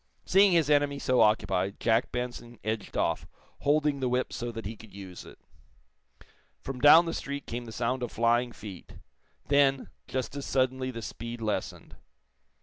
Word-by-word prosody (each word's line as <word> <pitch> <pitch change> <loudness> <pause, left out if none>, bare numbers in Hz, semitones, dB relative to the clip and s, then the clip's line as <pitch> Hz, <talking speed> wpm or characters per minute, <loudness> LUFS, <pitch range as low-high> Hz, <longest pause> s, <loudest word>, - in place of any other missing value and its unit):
Seeing 195 0 +5
his 165 -4 +3
enemy 145 -1 +3
so 130 -3 +2
occupied, 100 -3 +2
Jack 115 0 +2
Benson 120 -1 -5
edged 110 -1 -3
off, - - 0 0.3
holding 145 -1 +2
the 130 -1 0
whip 125 +1 -1
so 120 0 -4
that 115 -2 -7
he 110 +3 -5
could 110 -1 -15
use 95 -2 -10
it. - - -13 1.2
From 130 -2 -7
down 160 +5 +8
the 165 - -3
street 140 0 -5
came 120 +1 -5
the 115 - -9
sound 125 +3 -1
of 120 - -3
flying 120 +1 +2
feet. 105 -5 -10 0.5
Then, 140 -1 +3 0.2
just 130 +1 -3
as 140 - -4
suddenly 130 0 0
the 115 -3 -6
speed 115 +2 -6
lessened. 110 -2 -4
125 Hz, 165 wpm, -28 LUFS, 115-140 Hz, 1.2 s, down